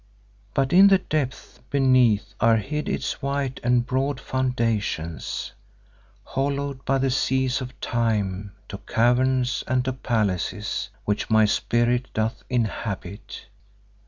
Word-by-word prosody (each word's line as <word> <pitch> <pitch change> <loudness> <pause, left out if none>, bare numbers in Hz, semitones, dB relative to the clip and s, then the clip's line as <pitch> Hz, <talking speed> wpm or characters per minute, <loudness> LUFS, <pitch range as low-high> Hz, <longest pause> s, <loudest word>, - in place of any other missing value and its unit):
But 135 +2 +1
in 190 +2 +8
the 195 -1 +6
depths 150 -7 -3
beneath 130 -6 +3
are 115 -1 +4
hid 150 +7 -3
its - - -2
white 140 -1 -2
and 120 0 +2
broad 135 +1 -1
foundations, 115 - -2 0.7
hollowed 140 0 -2
by 135 - +2
the 135 0 +1
seas 130 0 +1
of 125 0 -8
time 105 -4 -1 0.2
to 100 - -6
caverns 125 +2 +1
and 125 0 +1
to 130 - -1
palaces 105 -5 -1 0.2
which 105 +2 -1
my 110 -1 +5
spirit 120 +3 +1
doth 110 +1 -1
inhabit. 105 -5 -3
125 Hz, 120 wpm, -24 LUFS, 110-135 Hz, 0.7 s, in